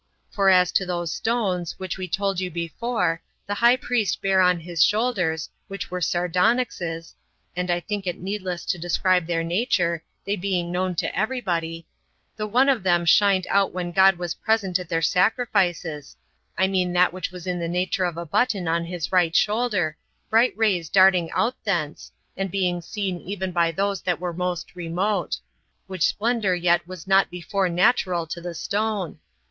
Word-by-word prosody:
For 195 -1 +3
as 180 -2 +5
to - - +2
those 175 -2 -3
stones, 195 -7 -1
22 - - -28
which 185 -1 -5
we 185 - -4
told 195 +1 -1
you 185 -1 -2
before, 170 +2 -2 0.2
the 205 - -3
high 235 +4 +5
priest 240 -6 -1
bare 190 -1 +3
on 180 -1 +3
his 165 -1 +1
shoulders, 200 -8 0 0.2
which 195 -3 -6
were 180 0 -3
sardonyxes, 175 -1 0 0.4
[and 180 0 -2
I 175 0 +2
think 205 0 -4
it 175 - -2
needless 185 -2 -4
to 180 - -1
describe 175 +1 +1
their 165 -1 0
nature, 170 -3 0 0.2
they 200 - 0
being 180 -3 -2
known 180 0 -1
to - - -2
every 220 +6 0
body,] 165 -5 -3 0.5
the 215 -1 -3
one 250 +6 +3
of 265 -6 +3
them 175 -2 +2
shined 190 +1 +4
out 200 0 +2
when 175 -1 -3
God 190 +1 +5
was 175 -1 -3
present 200 -5 0
at 180 -3 -8
their 165 -1 0
sacrifices; 180 - +1 0.4
I 190 - +3
mean 185 -2 0
that 180 0 +3
which 185 -1 -4
was 180 -1 -10
in 180 -1 -2
the 170 - -2
nature 180 +2 0
of 175 -2 -3
a 170 - -4
button 200 +1 0
on 170 +1 0
his 170 -2 -4
right 175 -3 +2
shoulder, 205 -7 +1 0.3
bright 230 +3 +4
rays 190 -8 +1
darting 185 -3 +5
out 240 +3 -1
thence, 170 -8 -2 0.2
and 195 0 -2
being 180 -2 0
seen 190 0 -3
even 190 -1 -4
by 170 -1 +2
those 195 +2 -1
that 180 -2 -1
were 175 -1 -3
most 180 0 -3
remote; 180 +2 -1 0.5
which 185 -3 0
splendor 220 -4 0
yet 175 -1 +2
was 185 -2 -9
not 195 0 +4
before 180 +2 -1
natural 180 -1 +2
to 170 +2 -6
the 175 0 -6
stone. 200 -2 -2
180 Hz, 180 wpm, -24 LUFS, 175-200 Hz, 0.5 s, as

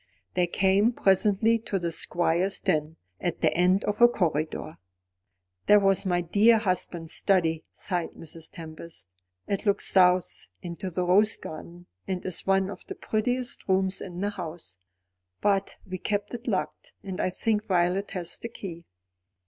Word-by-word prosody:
They 180 -1 +2
came 195 +6 +3
presently 210 +3 +3
to 215 -3 -3
the 170 -2 -2
Squire's 175 +3 +1
den, 155 -3 -1 0.2
at 175 - -3
the - - +3
end 180 +3 +3
of 210 +2 -2
a 240 - +10
corridor. 155 -7 -2 0.9
"That 210 -1 +6
was 195 0 +3
my 175 -1 +2
dear 210 +7 +4
husband's 180 -5 -2
study," 165 -5 +1
sighed 175 -3 -3
Mrs. 165 0 -6
Tempest. 165 - -9 0.4
"It 200 - -1
looks 200 - +2
south, 180 - +3 0.2
into 175 +2 -5
the 180 0 -2
rose 205 +5 +4
garden, 170 +3 -9 0.2
and 185 -2 -3
is 185 0 -3
one 195 0 +2
of 190 - -10
the - - -6
prettiest 245 +3 -2
rooms 190 0 +1
in 180 -1 -6
the 205 +1 0
house. 165 - -8 0.6
But 200 -1 +1
we 185 -1 -6
keep 205 +3 -2
it 240 0 -7
locked, - - -3
and 190 -2 -4
I - - +1
think 215 +3 0
Violet 185 +1 +1
has 175 -3 -3
the 230 - -6
key." 170 -7 -8
185 Hz, 155 wpm, -27 LUFS, 175-205 Hz, 0.9 s, a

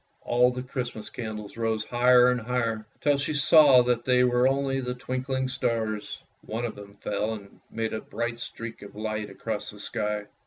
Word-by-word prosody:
All 125 +1 +3
the 125 0 -5
Christmas 125 -4 -5
candles 110 -2 -6
rose 110 -1 0
higher 125 +1 +5
and 125 -1 -1
higher, 115 -2 -1
till 145 -1 +3
she 140 +2 -2
saw 140 -3 +7
that 120 -1 +1
they 125 0 +4
were 125 0 +4
only 135 0 +1
the 125 -1 -3
twinkling 130 +1 -2
stars. 110 -4 -2 0.3
One 115 +2 -3
of 115 - -3
them 100 0 -12
fell 105 +2 -2
and 100 -2 -13
made 115 0 -3
a 110 - -3
bright 120 +1 -4
streak 115 -1 -7
of 100 - -11
light 110 0 -3
across - - -4
the - - -10
sky. 105 -1 -2
120 Hz, 185 wpm, -27 LUFS, 110-125 Hz, 0.3 s, saw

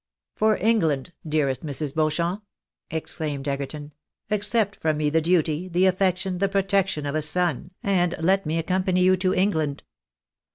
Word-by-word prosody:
"For 215 0 +2
England! 175 -8 +1
dearest 150 -3 0
Mrs. 145 -1 -2
Beauchamp!" 170 +5 0 0.5
exclaimed 150 -3 -4
Egerton. 145 +2 -4 0.2
" - - -35
Accept 210 0 +1
from 155 -1 0
nie 150 -1 0
the 160 +1 +3
duty, 165 0 +1
the 180 +1 +2
affection, 185 0 +1
the 195 0 +1
protection 195 -5 +1
of 140 - -2
a 155 - 0
son, 170 0 0
and 180 -3 +1
let 190 +4 +2
me 160 +2 0
accompany 185 +2 +1
you 185 +1 +5
to 185 0 +1
England." 160 -7 0
175 Hz, 155 wpm, -24 LUFS, 155-190 Hz, 0.5 s, you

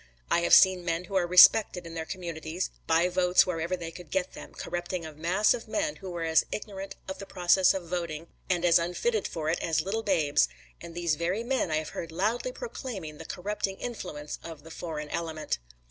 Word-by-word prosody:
I - - +4
have 170 - +6
seen 185 -2 +6
men 170 0 -1
who 180 - -11
are 180 -2 +2
respected 180 0 +7
in 165 - -8
their 160 -1 -5
communities, 170 -1 -4 0.2
buy 165 +2 +4
votes 180 0 +4
wherever 170 0 -2
they 165 -1 -6
could 175 -1 -11
get 190 +1 -1
them, - - -10
corrupting 175 0 -4
a 155 - -8
mass 175 +7 +2
of 235 -1 -6
men 300 +6 -1
who 190 - -8
were 175 -2 -4
as 160 -1 +4
ignorant 195 -2 -6
of 190 - -5
the 195 - -8
process 185 +1 +4
of 180 -3 -5
voting 165 -2 -3 0.2
and 180 -1 +1
as 170 0 +6
unfitted 305 - -1
for 160 -2 -4
it, 170 - -1
as 160 -1 +1
little 200 +6 -2
babes; 155 - +2 0.3
and 170 - -9
these 170 -2 +1
very 175 +8 -1
men 255 -6 0
I 155 - 0
have 155 0 -2
heard 165 - -6
loudly 215 - -1
proclaiming 235 - -7
the 165 - -8
corrupting 195 +2 -3
influence 155 -11 -6
of 160 -3 -9
the 165 - -12
foreign 155 -3 -5
element. 160 - -3
175 Hz, 210 wpm, -28 LUFS, 165-190 Hz, 0.3 s, respected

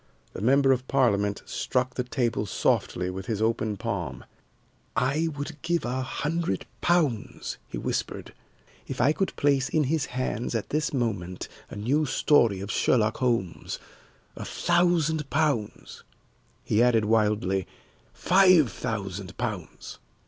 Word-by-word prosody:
The - - -6
member 135 +4 +4
of 130 0 0
Parliament 105 -7 +1
struck 130 0 -1
the 125 - -2
table 120 -4 -1
softly 90 -1 0
with 95 +1 -7
his 110 -3 -1
open 110 -1 0
palm. 100 -7 -4 0.7
"I 145 +6 +1
would 145 +1 -6
give 170 +1 0
a 125 +2 -1
hundred 150 - -2 0.2
pounds," 155 -11 0
he - - -6
whispered, - - -3 0.5
"if - - -5
I 140 +5 +4
could 195 +3 -2
place 140 -2 +2
in 155 - +2
his 150 +1 0
hands 125 -1 -3
at 110 - -2
this 150 0 0
moment 100 -9 -2 0.2
a - - -8
new 135 +9 +1
story 120 -8 +3
of 100 +2 -4
Sherlock 110 -3 +2
Holmes 115 -9 -1 0.6
a - - -6
thousand 165 -4 +1
pounds," 140 -9 -1 0.6
he 110 - +2
added 120 -3 +4
wildly 105 -4 +1 0.4
"five 185 - +5
thousand 95 -3 -5
pounds!" 105 -9 -5
125 Hz, 135 wpm, -27 LUFS, 105-150 Hz, 0.7 s, five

